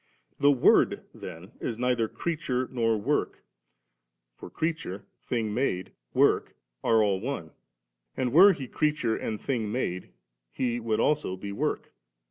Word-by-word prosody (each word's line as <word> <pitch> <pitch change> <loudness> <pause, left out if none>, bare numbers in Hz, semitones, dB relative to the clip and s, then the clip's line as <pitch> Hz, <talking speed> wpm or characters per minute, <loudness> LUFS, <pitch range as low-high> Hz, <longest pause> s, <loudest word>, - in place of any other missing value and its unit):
71. - - -21
The 125 - -6
Word - - +5
then 90 +3 -9
is 115 - -3
neither 125 -2 +1
creature 135 -4 -2
nor 115 -3 +1
work; 105 - -1 0.9
for - - -11
creature, 155 - -3 0.2
thing 110 -4 -2
made, 105 -7 -1 0.2
work, - - +2 0.3
are 110 -1 +4
all 100 -2 +1
one; 110 - -4 0.7
and 125 -2 -1
were 190 +6 +9
He 135 -6 -6
creature 150 -6 0
and 110 -2 -3
thing 115 -6 -2
made, 90 -7 -2 0.4
He 120 - -1
would 110 -2 -1
also 150 -11 +1
be 100 +2 -6
work. 100 - -2
115 Hz, 140 wpm, -28 LUFS, 105-130 Hz, 0.9 s, were